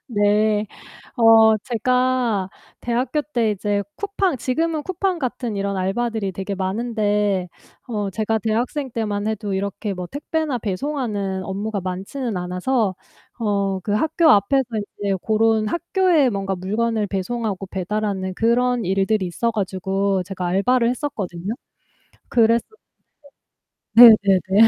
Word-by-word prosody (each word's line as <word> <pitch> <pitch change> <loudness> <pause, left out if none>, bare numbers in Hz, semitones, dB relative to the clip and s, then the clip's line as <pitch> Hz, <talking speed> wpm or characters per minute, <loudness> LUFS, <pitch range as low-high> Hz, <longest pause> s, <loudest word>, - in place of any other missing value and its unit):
네. 210 -1 +2 0.5
어 225 -1 +6
제가 245 -3 0 0.3
대학교 245 +5 -1
때 240 -7 0
이제 205 0 -1
쿠팡 390 -6 -1
지금은 310 +6 -1
쿠팡 370 -1 -1
같은 245 -5 -3
이런 200 0 -2
알바들이 205 +2 -1
되게 195 +2 -4
많은데 205 -1 0 0.4
어 210 -4 -2
제가 220 +2 -1
대학생 240 +6 -2
때만 210 -2 -2
해도 210 -2 -2
이렇게 200 +2 -3
뭐 180 -1 -5
택배나 290 - -2
배송하는 205 -3 -3
업무가 200 +2 -3
많지는 195 +5 -4
않아서 185 +4 -1 0.5
어 200 -3 0
그 205 - -2
학교 315 +9 +2
앞에서 240 +6 +4 0.4
이제 200 -1 0
고런 220 +1 +2
학교에 340 - +2
뭔가 195 -2 -2
물건을 215 +4 -1
배송하고 200 0 -3
배달하는 190 0 -3
그런 240 +2 +1
일들이 195 +2 +1
있어 180 +7 -1
가지고 195 -2 -1
제가 185 0 -5
알바를 235 +7 +2
했었거든요. 205 - -4 0.8
그랬었는데 230 -1 +3 1.3
네네네. 210 -3 +7
215 Hz, 280 characters per minute, -21 LUFS, 195-240 Hz, 1.3 s, 네네네